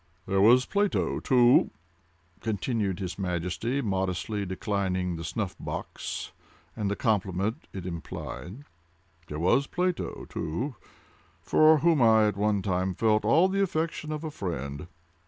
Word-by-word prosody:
"There 95 Hz, 0 st, +1 dB
was 125 Hz, +5 st, +6 dB
Plato, 205 Hz, 0 st, 0 dB
too," 125 Hz, -1 st, +5 dB, 0.7 s
continued 105 Hz, -3 st, -1 dB
his 90 Hz, 0 st, -5 dB
Majesty, 95 Hz, +9 st, -2 dB
modestly 95 Hz, 0 st, -2 dB
declining 95 Hz, -2 st, -1 dB
the 80 Hz, -, -6 dB
snuff 100 Hz, +3 st, -3 dB
box -, -, -5 dB, 0.4 s
and 105 Hz, -3 st, -1 dB
the 100 Hz, -, -1 dB
compliment 100 Hz, -2 st, -1 dB
it 95 Hz, -2 st, -7 dB
implied—"there 85 Hz, -, -9 dB
was 95 Hz, -, +3 dB
Plato, 180 Hz, 0 st, -2 dB
too, 120 Hz, -, -3 dB, 0.7 s
for 155 Hz, -, +5 dB
whom 160 Hz, -1 st, +3 dB
I, 110 Hz, -2 st, +6 dB
at 105 Hz, -, -1 dB
one 105 Hz, -1 st, +1 dB
time, 95 Hz, -1 st, 0 dB
felt 110 Hz, 0 st, +2 dB
all 150 Hz, +12 st, +5 dB
the 195 Hz, +1 st, 0 dB
affection 160 Hz, -4 st, -1 dB
of 155 Hz, +1 st, -4 dB
a 155 Hz, -, -4 dB
friend. 75 Hz, -, -5 dB
100 Hz, 130 wpm, -28 LUFS, 90-125 Hz, 0.7 s, was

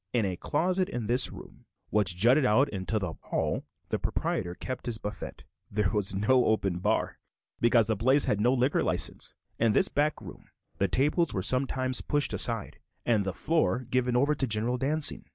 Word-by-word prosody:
In 115 Hz, -4 st, +1 dB
a 95 Hz, -2 st, -2 dB
closet 180 Hz, -, -1 dB
in 120 Hz, -3 st, -4 dB
this 120 Hz, +4 st, +2 dB
room -, -, -13 dB, 0.3 s
which 100 Hz, -5 st, +2 dB
jutted 125 Hz, +9 st, +4 dB
out 130 Hz, +4 st, +3 dB
into 100 Hz, +2 st, -2 dB
the 90 Hz, -6 st, -3 dB
hall -, -, -2 dB, 0.2 s
the -, -, -1 dB
proprietor 85 Hz, 0 st, -2 dB
kept 130 Hz, +5 st, -6 dB
his 115 Hz, -2 st, -2 dB
buffet. 105 Hz, -1 st, -7 dB, 0.3 s
There 105 Hz, -2 st, 0 dB
was 100 Hz, -3 st, 0 dB
no 125 Hz, +6 st, +3 dB
open 95 Hz, -5 st, 0 dB
bar, -, -, -1 dB, 0.4 s
because 115 Hz, -1 st, +4 dB
the 110 Hz, -, 0 dB
place 130 Hz, +7 st, +3 dB
had 105 Hz, -, 0 dB
no 120 Hz, +3 st, +3 dB
liquor 130 Hz, +1 st, +1 dB
license. -, -, -1 dB, 0.2 s
In 115 Hz, -2 st, +3 dB
this -, -, +3 dB
back 150 Hz, +1 st, 0 dB
room -, -, -12 dB, 0.3 s
the 100 Hz, -, +2 dB
tables 150 Hz, -, +1 dB
were 95 Hz, -, -1 dB
sometimes 130 Hz, +1 st, +3 dB
pushed 145 Hz, -1 st, 0 dB
aside, 115 Hz, -3 st, 0 dB, 0.3 s
and 110 Hz, -4 st, +2 dB
the 95 Hz, -, -2 dB
floor 155 Hz, -, 0 dB
given 125 Hz, -1 st, +1 dB
over 140 Hz, +4 st, +2 dB
to 135 Hz, -2 st, -1 dB
general 115 Hz, +3 st, 0 dB
dancing. 145 Hz, +3 st, -1 dB
120 Hz, 185 wpm, -28 LUFS, 105-135 Hz, 0.4 s, jutted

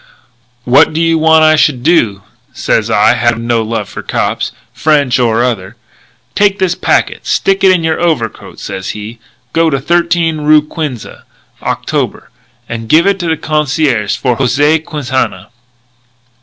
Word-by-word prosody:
'What 135 Hz, +6 st, +4 dB
do 160 Hz, -, -2 dB
you 165 Hz, -1 st, +2 dB
want 160 Hz, 0 st, +4 dB
I 155 Hz, 0 st, +5 dB
should 150 Hz, -5 st, +1 dB
do?' 115 Hz, -, +2 dB, 0.3 s
sez -, -, -1 dB
I, 105 Hz, +3 st, +4 dB
havin' 120 Hz, -1 st, 0 dB
no 115 Hz, -1 st, +1 dB
love 110 Hz, -1 st, -3 dB
for -, -, -8 dB
no -, -, -25 dB
cops, -, -, -2 dB, 0.2 s
French 145 Hz, -5 st, +1 dB
or 115 Hz, -1 st, +2 dB
other. 110 Hz, -4 st, -3 dB, 0.6 s
'Take 200 Hz, -1 st, +2 dB
this 185 Hz, -3 st, 0 dB
packet -, -, 0 dB
and -, -, -27 dB
stick 195 Hz, 0 st, 0 dB
it 190 Hz, -, +6 dB
in 180 Hz, -3 st, +1 dB
your 160 Hz, 0 st, -1 dB
overcoat,' 150 Hz, -, -2 dB
sez 95 Hz, -1 st, -6 dB
he. 110 Hz, +3 st, -8 dB, 0.3 s
'Go 165 Hz, 0 st, +2 dB
to 140 Hz, -3 st, -1 dB
13 170 Hz, +1 st, 0 dB
roo 150 Hz, 0 st, +4 dB
Quinze 150 Hz, -6 st, -5 dB, 0.6 s
Octobre -, -, -3 dB, 0.4 s
and 115 Hz, -1 st, -6 dB
give 160 Hz, +2 st, +4 dB
it 200 Hz, -1 st, +1 dB
to 175 Hz, -, -3 dB
the 160 Hz, -, 0 dB
concierge 145 Hz, -7 st, 0 dB
for 125 Hz, -3 st, -1 dB
José 145 Hz, +5 st, +2 dB
Quintana.' 130 Hz, -, -3 dB
150 Hz, 160 wpm, -12 LUFS, 120-160 Hz, 0.6 s, it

